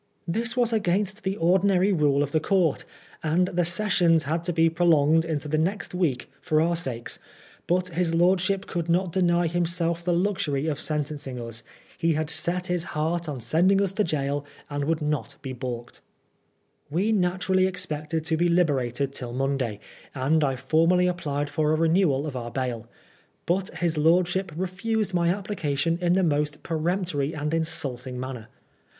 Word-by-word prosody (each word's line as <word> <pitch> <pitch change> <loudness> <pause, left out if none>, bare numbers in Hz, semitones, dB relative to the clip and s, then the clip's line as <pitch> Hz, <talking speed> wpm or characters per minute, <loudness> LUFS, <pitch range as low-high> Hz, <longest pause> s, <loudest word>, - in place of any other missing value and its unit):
This 225 +7 -1
was 240 -2 +2
against 200 0 0
the 195 0 -2
ordinary 190 +3 +3
rule 145 -4 +3
of 145 - -4
the 155 - +2
court, 170 -2 +1 0.4
and 170 +4 +1
the 175 0 +1
sessions 175 -3 +2
had 165 +3 -1
to 175 - 0
be 165 -1 +3
prolonged 165 -2 +4
into 155 -2 -2
the 155 +1 0
next 180 +2 -1
week 165 -9 0
for 155 - +1
our 170 +2 +2
Bakes; 130 -8 -3 0.5
but 180 +1 +1
his 170 0 0
lordship 190 +3 +2
could 170 -2 -3
not 180 +1 +2
deny 175 -1 +2
himself 170 0 -1
the 175 - 0
luxury 170 -6 0
of 150 -3 -1
sentencing 145 -4 -3
us. 115 -1 -5 0.4
He 165 0 +2
had 155 +1 -1
set 175 +3 -1
his 180 -2 -1
heart 165 +2 -1
on 140 -4 -4
send 160 - +3
ing 195 - +3
us 200 -2 +1
to 210 +2 0
gaol, 145 -3 -1 0.3
and 145 0 -2
would 160 0 0
not 150 -1 -2
be 130 -2 -4
baulked. 120 -2 -6 0.9
We 185 +9 +1
naturally 185 -1 +2
expected 155 -3 -3
to 160 0 0
be 175 +1 +2
liberated 140 -6 +1
till 120 -3 -5
Monday, 130 -5 -1 0.4
and 145 +4 +2
I 135 -2 +1
formally 165 +7 +3
applied 150 -5 -1
for 150 +1 0
a - - +3
renewal 160 -3 +2
of 145 -4 -5
our 120 -1 -4
bail. 120 -3 -3 0.6
But 185 +2 0
his 170 -3 0
lordship 175 +4 +2
refused 195 +3 -1
my 170 -1 +2
application 170 -5 -1
in 175 0 +3
the 190 +1 +3
most 150 -2 0
peremp 170 +4 -1
tory 145 +2 -1
and 150 +1 -2
insulting 130 -6 -2
manner. 125 -3 -6
165 Hz, 170 wpm, -25 LUFS, 145-180 Hz, 0.9 s, prolonged